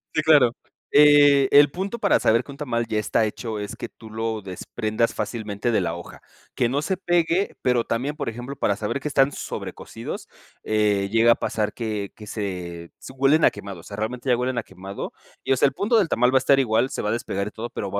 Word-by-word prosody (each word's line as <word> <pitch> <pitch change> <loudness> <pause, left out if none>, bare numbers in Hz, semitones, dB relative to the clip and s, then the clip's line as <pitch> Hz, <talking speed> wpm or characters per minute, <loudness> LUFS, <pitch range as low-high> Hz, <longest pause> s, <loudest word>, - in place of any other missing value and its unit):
Sí, - - +3
claro, 150 -6 +5 0.4
eh, 145 -2 +6
el 145 0 +7
punto 195 +8 -4
para 205 -3 +3
saber 115 +2 +3
que 140 - -11
un 140 - -11
tamal 120 -6 -2
ya 110 -1 0
está 110 +1 +1
hecho, 110 +1 -4
es 105 +2 -5
que - - -7
tú 110 -2 -14
lo 110 0 -3
desprendas 110 +4 -2
fácilmente 110 0 -3
de 110 - +2
la 85 -2 -2
hoja. 85 - -10 0.3
Que 120 - +1
no 140 +4 -1
se 190 +3 -1
pegue, 175 +1 +1
pero 125 -2 +2
también, 130 +7 -2
por 140 -5 -3
ejemplo, 120 +4 -7
para 100 - 0
saber 105 +6 -3
que 145 - -5
están 135 -1 +3
sobrecosidos, - - -7 0.4
eh, 105 -2 +1
llega 115 +1 +5
a - - +5
pasar 105 -1 -2
que 105 -4 -4
que 105 - -12
se 90 -5 -5
se - - -10
Huelen 140 +4 +3
a - - +7
quemado. 100 -3 -9
O - - -14
sea, 100 +2 -9
realmente 120 +4 -3
ya 125 - +4
huelen 125 0 -1
a - - -5
quemado. 95 0 -8 0.3
Y, - - -2
o 135 - +4
sea, - - +4
el 135 - -3
punto 215 - +1
del 195 -7 +2
tamal 125 +1 +3
va 135 - +4
a - - +5
estar 140 -1 +5
igual, 120 0 +1
se - - -3
va 105 - -2
a - - +1
despegar 100 -3 -2
y - - -6
todo, 115 +3 -7
pero - - -4
va 100 - -1
115 Hz, 240 wpm, -23 LUFS, 105-140 Hz, 0.4 s, el